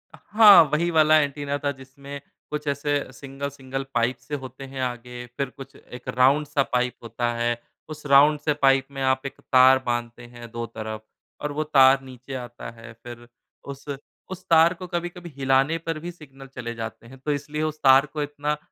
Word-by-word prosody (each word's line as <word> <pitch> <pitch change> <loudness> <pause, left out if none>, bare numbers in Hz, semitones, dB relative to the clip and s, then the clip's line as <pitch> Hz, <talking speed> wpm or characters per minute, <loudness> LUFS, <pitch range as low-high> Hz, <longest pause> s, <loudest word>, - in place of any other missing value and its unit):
हाँ, 210 -4 +7
वही 170 +3 +1
वाला 155 -1 +5
एंटीना 145 -1 -2
था 145 - +1
जिसमें 140 +1 -10 0.3
कुछ 150 0 -4
ऐसे 145 0 -1
सिंगल 140 0 -6
सिंगल 135 -1 -6
पाइप्स 120 +1 -1
से 150 - -3
होते 130 -1 -9
हैं 135 0 -6
आगे। 125 -1 -5
फिर 140 -2 -2
कुछ 135 +1 -12
1 125 -2 -13
राउंड 140 +4 +4
सा 140 -1 +1
पाइप 125 0 +1
होता 120 +1 -2
है। 120 0 -1 0.3
उस 155 -1 -9
राउंड 145 +2 +5
से 150 0 0
पाइप 135 -2 +3
में 135 -1 -6
आप 130 +1 +1
1 140 - -7
तार 130 0 +5
बाँधते 120 0 -3
हैं 120 -1 -12
दो 115 0 -4
तरफ़ 110 -1 -7 0.4
और 150 - -2
वो 150 +2 -2
तार 135 -3 +5
नीचे 130 0 -11
आता 120 -2 -7
है। 115 0 -10
फिर 120 -1 -10 0.4
उस 140 0 -9 0.5
उस 185 -1 -7
तार 165 +1 +6
को 180 0 -9
कभी-कभी 175 0 -5
हिलाने 135 +4 +2
पर 165 -1 -4
भी 175 +2 -6
सिग्नल 135 -5 -14
चले 120 -3 -7
जाते 115 0 -7
हैं 130 +3 -13
तो 150 +3 -3
इसलिए 150 +1 -3
उसे 155 -1 -3
तार 135 +1 +7
को 150 - -3
इतना 145 +1 -3
135 Hz, 190 wpm, -24 LUFS, 125-150 Hz, 0.5 s, हाँ